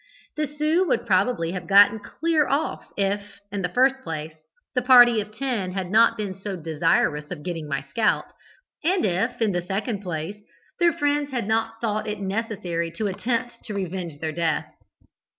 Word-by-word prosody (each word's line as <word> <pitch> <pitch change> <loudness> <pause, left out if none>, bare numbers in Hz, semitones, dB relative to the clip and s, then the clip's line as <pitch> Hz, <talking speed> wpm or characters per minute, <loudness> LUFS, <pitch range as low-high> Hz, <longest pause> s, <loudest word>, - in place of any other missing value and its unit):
The 305 -1 -1
Sioux 305 +5 +1
would 240 -4 0
probably 190 -4 +1
have 185 0 -5
got 205 +2 +6
clear 320 -3 +1
off 285 +4 -2
if, 200 0 -2
in 200 -1 -3
the 180 - -1
first 265 +5 +3
place, 160 -5 -5 0.4
the 250 - +1
party 245 -3 +7
of 210 +1 -9
ten 215 -6 -2
had 190 -2 -3
not 225 +2 +5
been 205 -3 -3
so 195 +1 -6
desirous 160 -2 +1
of 160 -5 -7
getting 165 -4 -4
my 140 -1 -2
scalp, 210 +10 +1 0.6
and 360 - +2
if, 210 +7 0
in 215 - +2
the 175 -1 -1
second 200 +3 -3
place, 175 +1 -4 0.4
their 345 -1 +5
friends 290 -1 0
had 245 -6 -3
not 225 0 0
thought 215 -2 -1
it 210 -1 -3
necessary 190 -5 -2
to 220 - -3
attempt 235 +4 -2
to 210 - -4
revenge 180 -5 -4
their 160 0 -2
death. 160 -1 -1
205 Hz, 175 wpm, -24 LUFS, 180-245 Hz, 0.6 s, party